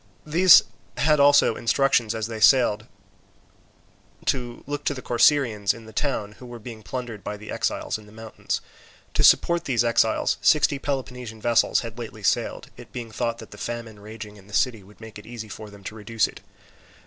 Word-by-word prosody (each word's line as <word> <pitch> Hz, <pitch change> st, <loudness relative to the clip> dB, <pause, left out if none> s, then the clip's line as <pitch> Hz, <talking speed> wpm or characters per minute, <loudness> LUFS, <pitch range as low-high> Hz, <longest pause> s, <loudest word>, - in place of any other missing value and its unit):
These 175 Hz, +4 st, +7 dB, 0.3 s
had 150 Hz, +4 st, +3 dB
also 145 Hz, -5 st, +5 dB
instructions 120 Hz, -3 st, +1 dB
as 110 Hz, -1 st, -2 dB
they 110 Hz, 0 st, -6 dB
sailed 115 Hz, -1 st, +5 dB
by 110 Hz, -, -18 dB, 1.4 s
to 120 Hz, -3 st, -2 dB
look 145 Hz, +1 st, -4 dB
to 145 Hz, -, 0 dB
the 130 Hz, -, -7 dB
Corcyraeans 120 Hz, -5 st, +3 dB
in 115 Hz, -1 st, -12 dB
the 110 Hz, -, -13 dB
town, 110 Hz, -6 st, -2 dB
who 125 Hz, -, -10 dB
were 120 Hz, 0 st, -8 dB
being 115 Hz, -1 st, -10 dB
plundered 115 Hz, +1 st, -6 dB
by 105 Hz, -, -5 dB
the 105 Hz, +1 st, -9 dB
exiles -, -, -2 dB
in 105 Hz, -, -16 dB
the -, -, -16 dB
mountain. 110 Hz, 0 st, -13 dB, 0.7 s
To -, -, +1 dB
support 170 Hz, 0 st, +4 dB
these 120 Hz, -5 st, +1 dB
exiles 115 Hz, -1 st, +2 dB
sixty 145 Hz, +3 st, +3 dB
Peloponnesian 125 Hz, -5 st, -5 dB
vessels 120 Hz, +1 st, +2 dB
had 115 Hz, 0 st, -8 dB
lately 110 Hz, -2 st, -8 dB
sailed, -, -, -1 dB
it -, -, -13 dB
being 120 Hz, -2 st, -7 dB
thought 115 Hz, +1 st, -2 dB
that -, -, -12 dB
the -, -, -12 dB
famine 115 Hz, -3 st, -6 dB
raging 105 Hz, 0 st, -10 dB
in 100 Hz, -1 st, -17 dB
the 105 Hz, -, -15 dB
city 120 Hz, -5 st, +1 dB
would 100 Hz, +2 st, -19 dB
make 110 Hz, -1 st, -10 dB
it 105 Hz, -, -15 dB
easy 115 Hz, -2 st, -8 dB
for 110 Hz, 0 st, -9 dB
them 100 Hz, -1 st, -15 dB
to 100 Hz, -, -6 dB
reduce 110 Hz, +1 st, 0 dB
it. -, -, -9 dB
115 Hz, 195 wpm, -24 LUFS, 110-130 Hz, 1.4 s, These